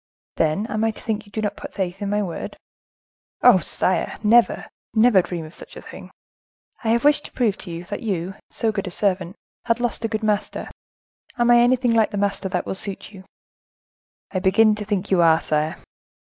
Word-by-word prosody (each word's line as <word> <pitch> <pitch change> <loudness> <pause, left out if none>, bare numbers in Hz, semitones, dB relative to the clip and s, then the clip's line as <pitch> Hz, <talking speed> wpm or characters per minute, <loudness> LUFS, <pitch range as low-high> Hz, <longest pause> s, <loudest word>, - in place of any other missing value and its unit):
"Then, 160 +6 +1
am 215 -1 -2
I 225 - +3
to 220 - -7
think 215 -2 -3
you - - -18
do 215 -1 -1
put - - -10
no - - -24
faith 190 0 -3
in 200 - -2
my 210 0 +1
word?" 175 -4 -6 0.9
"Oh! 240 -7 +7
sire, 185 +1 0
never—never 225 -1 +3
dream 170 -2 -5
of 155 - -12
such - - -12
a - - -8
thing." - - -11 0.7
"I - - -3
have 235 +3 +2
wished 295 0 +4
to - - -10
prove 225 -6 +1
to 190 - -8
you, 170 0 -6
that 180 - -6
you, 190 -4 -2 0.2
so 225 - -1
good 200 -2 -3
a - - -2
servant, 185 -1 -1 0.3
had 230 -1 +1
lost 240 -1 -2
a - - +1
good 220 0 -3
master; 210 -1 -1 0.7
am 240 0 +3
I 240 - +7
anything 245 0 +3
like 225 -1 +3
the 205 - -5
master 200 -1 -1
that 180 -1 -2
will - - -3
suit 195 +1 -5
you?" 190 -2 -13 1.1
"I 185 - -1
begin 205 +4 +4
to 210 0 -5
think 200 -3 -2
you 185 -2 +4
are, 165 -1 +5
sire." 155 +1 -1
205 Hz, 205 wpm, -22 LUFS, 185-225 Hz, 1.1 s, Oh